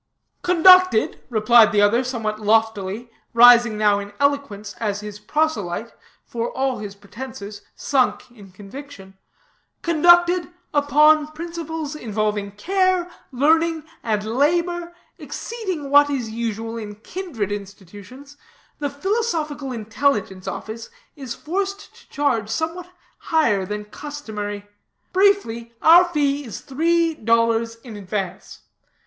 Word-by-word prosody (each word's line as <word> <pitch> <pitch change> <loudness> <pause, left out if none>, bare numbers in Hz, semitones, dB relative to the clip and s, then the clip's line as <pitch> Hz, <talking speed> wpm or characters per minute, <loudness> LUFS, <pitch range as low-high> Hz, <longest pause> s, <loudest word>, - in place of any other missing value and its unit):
"Conducted," 365 -6 +5
replied 225 0 +5
the 205 0 +3
other 230 +5 +3
somewhat 225 -4 -3
loftily, 220 +1 0 0.2
rising 240 -2 +7
now 210 -1 +3
in 205 0 -8
eloquence 280 -8 -1
as 205 -2 -2
his 210 0 -8
proselyte, 225 - -2 0.3
for 235 0 -3
all 265 -2 -2
his 205 -1 -7
pretenses, 205 -1 -9
sunk 255 -3 0
in 205 -5 -15
conviction, 195 0 -11 0.7
"conducted 345 +2 +4 0.2
upon 300 +1 +4
principles 325 -2 -5
involving 210 -5 -2
care, 370 - 0 0.2
learning, 320 +4 +2 0.2
and 215 -3 -1
labor, 340 +8 0 0.2
exceeding 375 -12 -5
what 290 0 +6
is 250 -6 -3
usual 225 0 -4
in 210 -2 -7
kindred 230 - -5
institutions, 205 +7 -10 0.4
the 290 -1 -2
Philosophical 305 - -2
Intelligence 220 -4 -1
Office 225 +1 -6 0.3
is 265 -5 -7
forced 395 +4 -4
to - - -21
charge 235 -8 0
somewhat 330 +6 -3 0.3
higher 220 - +1
than 210 +1 -5
customary. 210 -6 -7 0.5
Briefly, 300 - +1
our 340 +3 +7
fee 290 -4 0
is 230 -6 -8
three 330 +4 +1
dollars 230 -2 +1
in 230 -4 -9
advance. 195 -2 -5
245 Hz, 115 wpm, -21 LUFS, 210-315 Hz, 0.7 s, rising